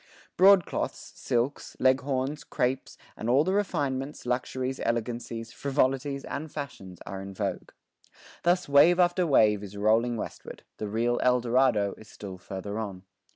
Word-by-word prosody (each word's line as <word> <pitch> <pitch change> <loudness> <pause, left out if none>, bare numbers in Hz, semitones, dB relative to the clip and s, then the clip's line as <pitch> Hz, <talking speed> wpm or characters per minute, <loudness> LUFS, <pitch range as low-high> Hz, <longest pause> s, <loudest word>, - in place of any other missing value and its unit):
Broadcloths, 190 -2 +3
silks, 120 +4 -2
leghorns, 130 +2 +1
crapes, 130 +2 -2 0.2
and 110 - -4
all 135 +4 +5
the 185 +3 0
refinements, 145 -10 -1
luxuries, 130 +1 -2
elegancies, 115 -1 -3
frivolities, 140 0 0
and 155 +1 -5
fashions 120 - -7
are 95 +1 -6
in 95 0 -8
vogue. - - -3 0.7
Thus 180 +1 +2
wave 145 +6 +6
after 175 0 +3
wave 105 -8 +4
is 100 0 -9
rolling 115 +3 +2
westward; - - -7
the 105 - -4
real 115 +3 0
Eldorado 125 -4 +3
is 110 - -14
still 95 -3 -9
farther 100 +3 -5
on. 95 -4 -5
125 Hz, 135 wpm, -28 LUFS, 110-140 Hz, 0.7 s, wave